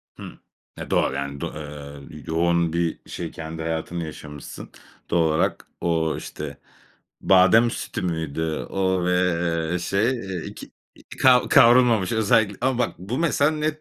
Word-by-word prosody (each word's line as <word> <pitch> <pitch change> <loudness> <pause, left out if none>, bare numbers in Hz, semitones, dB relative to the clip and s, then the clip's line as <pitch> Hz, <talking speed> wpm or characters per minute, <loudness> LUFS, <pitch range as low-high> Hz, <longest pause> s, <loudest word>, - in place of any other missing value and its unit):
Hımm. - - -10 0.4
E, - - -7
doğal, - - +2
yani, 70 0 -4
do - - -2
ııı, 75 -2 -9 0.2
yoğun 85 0 +1
bir 85 -1 -1
şey - - -5
kendi 80 0 -7
hayatını 80 +1 -3
yaşamışsın 75 -2 -9 0.4
doğal 85 -2 +3
olarak. 80 - 0
O, 80 -2 0
işte, 70 -2 -7 0.6
badem 95 +5 +5
sütü - - -5
müydü, 80 -2 -2
o 95 -2 0
ve, 90 - +1 0.6
eee, 90 - 0
şey, 100 +7 +1
eee, 95 -9 -4
2, - - -10 0.2
iii, - - -20 0.2
kav 125 -1 +6
kavrulmamış 120 -5 +5
özellikle 110 -2 +2
ama 130 -1 +1
bak, 125 - 0
bu 105 - -4
mesela 150 -3 +2
net 155 0 -2
85 Hz, 150 wpm, -23 LUFS, 80-115 Hz, 0.6 s, kav